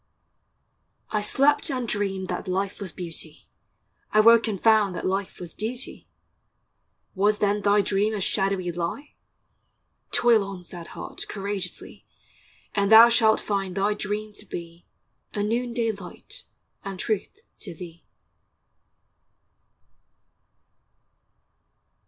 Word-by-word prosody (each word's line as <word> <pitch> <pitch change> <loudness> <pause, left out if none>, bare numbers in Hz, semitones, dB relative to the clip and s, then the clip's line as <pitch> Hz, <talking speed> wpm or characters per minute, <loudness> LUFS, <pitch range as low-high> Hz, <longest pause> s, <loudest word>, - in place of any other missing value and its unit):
I 215 - +1
slept 275 +7 +2
and 255 -3 -2
dreamed 195 -3 -1
that - - -4
life 195 +2 -2
was 190 -3 -5
Beauty: 165 -3 -7 0.6
I 215 - +4
woke 230 +1 +7
and 205 -4 -2
found 215 -4 +4
that - - -4
life 195 +1 -2
was 175 -2 -8
Duty: 240 +4 -5 1.1
Was 205 +2 +2
then 205 0 +1
thy 205 0 +4
dream 205 +2 +1
a - - -2
shadowy 195 -2 0
lie? 175 - -4 1.0
Toil 230 -3 +4
on, 195 -2 -7
sad 170 -1 -8
heart, - - -7
courageously, 200 -3 -5 0.7
And 200 0 +1
thou 225 +2 +10
shalt 220 -2 +4
find 195 -3 -2
thy 200 +2 +2
dream 210 +1 -4
to 210 - -11
be 170 -1 -8 0.5
A 205 - 0
noonday 235 +1 0
light 195 -4 -10 0.4
and 195 -1 -6
truth 220 - -2 0.2
to - - -7
thee. 170 -1 -10
205 Hz, 115 wpm, -25 LUFS, 190-220 Hz, 1.1 s, thou